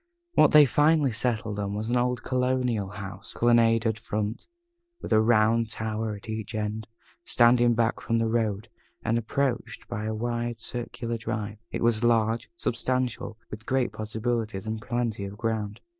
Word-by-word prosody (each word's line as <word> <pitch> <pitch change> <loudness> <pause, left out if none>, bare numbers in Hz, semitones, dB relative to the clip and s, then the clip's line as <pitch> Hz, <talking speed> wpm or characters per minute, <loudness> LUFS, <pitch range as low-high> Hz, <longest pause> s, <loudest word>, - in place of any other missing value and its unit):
What - - +6
they 150 -1 +8
finally 150 +1 +3
settled 110 -2 -2
on 100 0 -2
was 110 +3 -3
an - - +2
old 125 0 0
colonial 125 -5 0
house 100 0 -8
with - - -11
a - - -11
colonnaded 115 -2 +4
front, 105 0 -3 0.5
and - - -3
a 110 - +6
round 115 0 +3
tower 110 -1 -3
at 100 - -12
each 110 +1 -5
end, 105 0 -3 0.4
standing 120 0 +4
back 115 0 +1
from 115 - 0
the 115 - +1
road, 110 -3 -1 0.4
and 115 +1 +2
approached 125 +2 -2
by 105 +1 -4
a 110 0 -2
wide 120 +1 -2
circular 120 0 -4
drive. 110 -2 -4
It - - -3
was 115 -1 +2
large, 115 -1 +2
substantial, 125 -3 -1
with 110 +1 -8
great 130 -2 +1
possibilities, 110 -1 -2
and 110 0 -3
plenty 120 -3 -2
of 100 +1 -7
ground. 110 -2 -2
115 Hz, 165 wpm, -27 LUFS, 110-120 Hz, 0.5 s, they